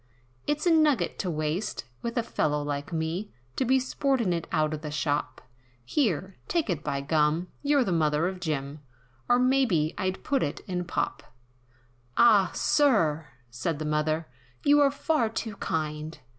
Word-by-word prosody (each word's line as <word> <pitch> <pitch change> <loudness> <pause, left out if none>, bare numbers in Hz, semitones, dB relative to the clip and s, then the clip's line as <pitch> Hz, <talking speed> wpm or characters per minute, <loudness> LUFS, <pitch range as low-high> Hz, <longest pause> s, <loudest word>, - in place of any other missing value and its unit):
"It's 295 +2 0
a 345 - +5
nugget 310 -5 +3
to 185 - -1
waste, 155 - -2 0.2
with 235 +1 -4
a 235 - +2
fellow 150 -9 0
like 145 +3 -4
me, 165 +5 -2 0.2
To 260 - 0
be 260 +2 +4
sportin' 255 -6 0
it 170 -1 -3
out 155 -1 +1
of 155 - -5
the 155 - -5
shop, 145 -2 -2 0.4
Here! 190 - 0
take 325 - 0
it 155 -3 -3
by 140 - -2
gum! 155 +4 +1
you're 285 -2 +3
the 195 - -2
mother 155 0 +2
of 185 0 -4
Jim! 150 -4 -3 0.5
Or 245 - +6
maybe 250 - +2
I'd 185 0 -2
put 275 -2 +1
it 145 - -2
in 180 -1 -3
pop." 175 - -2 1.0
"Ah! 210 -6 +6
Sir" 165 - +2 0.2
said 140 +6 -2
the 155 - -4
mother 155 +1 0 0.4
"You're 285 -1 +5
far 280 -3 0
too 225 -1 -4
kind!" 155 0 -3
175 Hz, 160 wpm, -27 LUFS, 150-245 Hz, 1.0 s, Or